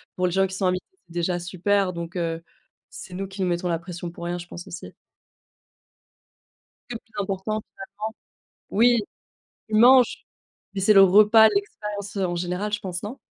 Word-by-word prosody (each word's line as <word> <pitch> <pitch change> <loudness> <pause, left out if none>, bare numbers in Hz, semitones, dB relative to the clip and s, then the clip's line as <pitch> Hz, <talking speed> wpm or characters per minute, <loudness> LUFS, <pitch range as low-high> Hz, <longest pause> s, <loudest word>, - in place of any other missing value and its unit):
Pour 180 - 0
les - - -2
gens 195 +2 +2
qui 190 - -7
sont 195 - -1
invités, 180 0 -1 0.2
c'est 170 - -16
déjà 175 +1 -1
super 185 +2 0
donc 170 +1 -7
heu, 165 -1 -2 0.5
c'est 180 - -10
nous 195 +2 -4
qui 195 +1 -8
nous 185 - +1
mettons 175 +1 -1
la 165 - 0
pression 175 0 -7
pour 170 - -9
rien, 175 +1 -2
je 175 0 -9
pense 175 0 -9
aussi. 175 - -9 2.0
C'est 245 - -5
le - - -5
plus 225 -3 -7
important, 200 +3 -3
finalement. - - -18 0.9
Oui. 235 +2 +4 0.7
Tu 215 - -1
manges. 245 +3 +5 0.5
Mais 195 - -3
c'est 210 +3 +5
le 195 - +8
repas, 210 +3 +7
l'expérience, 210 - -4
heu, 195 - +1
en 175 - -3
général, 180 +4 -3
je 210 - 0
pense 185 -3 -5
non? 220 +6 -6
190 Hz, 190 wpm, -24 LUFS, 175-210 Hz, 2.0 s, le